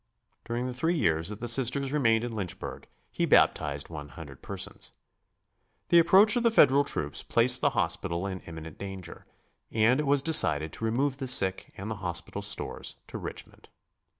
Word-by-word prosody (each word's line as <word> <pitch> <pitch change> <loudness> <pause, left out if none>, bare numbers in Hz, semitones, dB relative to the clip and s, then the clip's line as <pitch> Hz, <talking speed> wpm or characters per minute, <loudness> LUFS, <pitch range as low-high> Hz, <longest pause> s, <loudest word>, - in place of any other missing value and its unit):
During 120 +2 -3
the 130 - -4
three 160 +8 0
years 80 - 0
that 105 0 -8
the 120 - -3
Sisters 135 +3 +2
remained 115 -6 +2
in 120 -2 -5
Lynchburg 95 -5 -6 0.2
he - - -1
baptized 70 0 +2
one 75 -3 -8
hundred 65 - -11
persons. - - -5 1.0
The 170 - +7
approach 195 +5 +5
of 240 - +1
the 235 - +4
Federal 145 - +5
troops 75 - -3
placed 125 +2 +3
the 145 - +3
hospital 85 0 -1
in 95 -1 -4
imminent 80 -2 -10
danger, 95 -3 -8 0.4
and 115 +5 +3
it 150 - -1
was 140 0 +3
decided 80 - +3
to 115 - -5
remove 130 +4 0
the 135 -2 -5
sick 95 -6 0
and 100 +3 -6
the 110 - -4
hospital 85 -2 -2
stores - - -2
to - - -6
Richmond. - - -8
115 Hz, 175 wpm, -28 LUFS, 85-140 Hz, 1.0 s, The